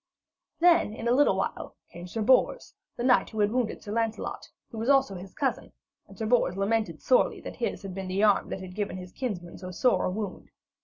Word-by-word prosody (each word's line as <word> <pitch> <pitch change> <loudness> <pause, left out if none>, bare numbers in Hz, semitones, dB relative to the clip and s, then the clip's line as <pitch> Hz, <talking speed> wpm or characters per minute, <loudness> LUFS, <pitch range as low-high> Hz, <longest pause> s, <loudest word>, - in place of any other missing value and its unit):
Then 335 -10 +4
in 230 - -4
a - - +3
little 290 +3 +4
while - - -3 0.2
came 175 +1 -9
Sir 220 +4 -3
Bors, 260 - +2 0.2
the 240 - -4
knight 250 0 +4
who 220 - -6
had 205 0 +3
wounded 245 -2 -1
Sir 205 - -7
Lancelot, 225 0 -2 0.2
who 225 - -6
was 230 +4 -1
also 270 -7 +4
his 185 +1 -9
cousin, 265 -2 -2 0.3
and - - -15
Sir 225 - -3
Bors 215 -5 +2
lamented 195 -4 -1
sorely - - +3
that - - -8
his - - -3
had 195 -2 -6
been 190 0 -5
the 190 +3 0
arm 205 -2 +3
that 190 - -5
had 185 -1 -8
given 200 -2 -3
his 180 -1 -9
kinsman 190 -10 -5
so 185 0 -7
sore 245 +8 +2
a - - +1
wound. 200 0 -5
215 Hz, 220 wpm, -28 LUFS, 190-245 Hz, 0.3 s, Then